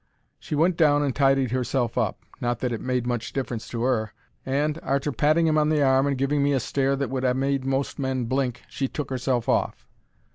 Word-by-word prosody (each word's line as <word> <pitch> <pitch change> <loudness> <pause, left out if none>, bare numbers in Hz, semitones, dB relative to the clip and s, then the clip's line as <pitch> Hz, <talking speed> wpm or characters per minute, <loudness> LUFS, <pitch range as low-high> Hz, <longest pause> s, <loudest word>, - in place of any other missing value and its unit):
She - - -4
went 165 +3 +2
down 145 -3 +4
and 140 -3 -1
tidied 135 -3 +3
herself 125 -1 -1
up—not 120 -1 -2
that 125 0 -2
it 115 - -3
made 125 -1 -1
much 120 -1 -3
difference 120 -4 -3
to 115 -1 -4
'er—and, 130 +5 -2
arter 140 +2 -1
patting 155 +6 +2
him 155 -1 +3
on 150 0 +2
the 150 -2 +2
arm 135 +1 +3
and 140 -1 0
giving 140 +2 +1
me 140 0 +2
a 135 - +2
stare 135 +3 0
that 140 -1 -3
would 130 -1 -2
ha' 125 -1 +2
made 135 0 0
most 135 +1 -1
men 130 -2 -1
blink, 125 0 -1
she 135 - -2
took 140 0 -5
herself 125 -2 -1
off. - - 0
135 Hz, 210 wpm, -25 LUFS, 125-140 Hz, -, down